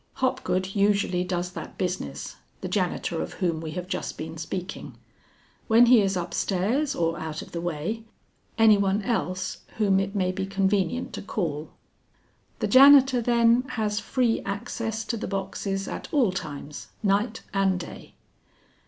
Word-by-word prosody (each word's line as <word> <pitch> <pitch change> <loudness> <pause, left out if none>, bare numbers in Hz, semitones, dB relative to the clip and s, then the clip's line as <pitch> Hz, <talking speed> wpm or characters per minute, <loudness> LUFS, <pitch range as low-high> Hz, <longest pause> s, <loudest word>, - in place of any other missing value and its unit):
"Hopgood 255 -8 -1
usually 200 -3 +2
does 180 -1 -2
that - - -8
business, 175 - -4 0.2
the - - -3
janitor - - -1
of 80 - -5
whom 170 -3 -1
we 160 - -5
have 180 0 -5
just - - -4
been 160 +1 -6
speaking. 175 +3 -6 0.7
When 230 +1 +7
he 240 -2 +7
is 195 -1 0
upstairs 210 - 0
or 165 0 0
out 160 -1 -5
of - - -14
the 170 - -4
way, 175 +7 -3 0.5
any 220 -2 +6
one 200 +1 +1
else 185 -4 -2 0.2
whom 200 -3 +3
it 195 +1 -3
may 185 -2 +1
be 190 +1 -3
convenient 195 +3 0
to - - -5
call." 160 -7 -3 0.9
"The - - +1
janitor, 270 -1 +7
then, 235 0 +4 0.2
has 210 -1 0
free 245 -3 0
access 225 +1 -4
to 230 +1 -2
the - - -4
boxes 195 0 -3
at - - -5
all 255 -10 +3
times, 150 -4 -6 0.2
night 210 +3 +1
and 195 -2 +2
day?" 175 - -10
195 Hz, 155 wpm, -26 LUFS, 180-225 Hz, 0.9 s, When